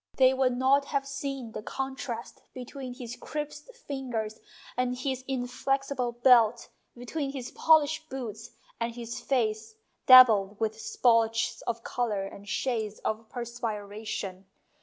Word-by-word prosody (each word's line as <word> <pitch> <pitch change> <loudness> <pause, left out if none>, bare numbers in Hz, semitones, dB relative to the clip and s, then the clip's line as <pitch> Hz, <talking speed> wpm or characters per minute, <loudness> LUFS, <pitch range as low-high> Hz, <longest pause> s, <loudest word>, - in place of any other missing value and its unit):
They 260 0 +6
would 260 -2 +1
not 275 +2 +4
have 280 -1 -2
seen 275 -3 -4
the - - -6
contrast 265 -1 -5
between 255 0 -7
his 245 -2 -7
crisped 300 - -6
fingers 245 - -4 0.4
and 250 0 0
his 260 0 -3
inflexible 265 0 -1
belt, 240 -2 +4 0.3
between 275 +3 -3
his 255 -3 -6
polished 315 0 +3
boots 235 -3 -6 0.3
and 230 0 -2
his 235 -1 -6
face 220 -4 -1 0.3
dabbled 215 -6 +8
with 220 0 -2
splotches 230 -1 +2
of 230 -1 -2
colour 220 -5 -1
and 200 +1 -10
shades 220 -5 -1
of 220 0 -3
perspiration. 215 -5 -5
245 Hz, 125 wpm, -28 LUFS, 225-270 Hz, 0.4 s, dabbled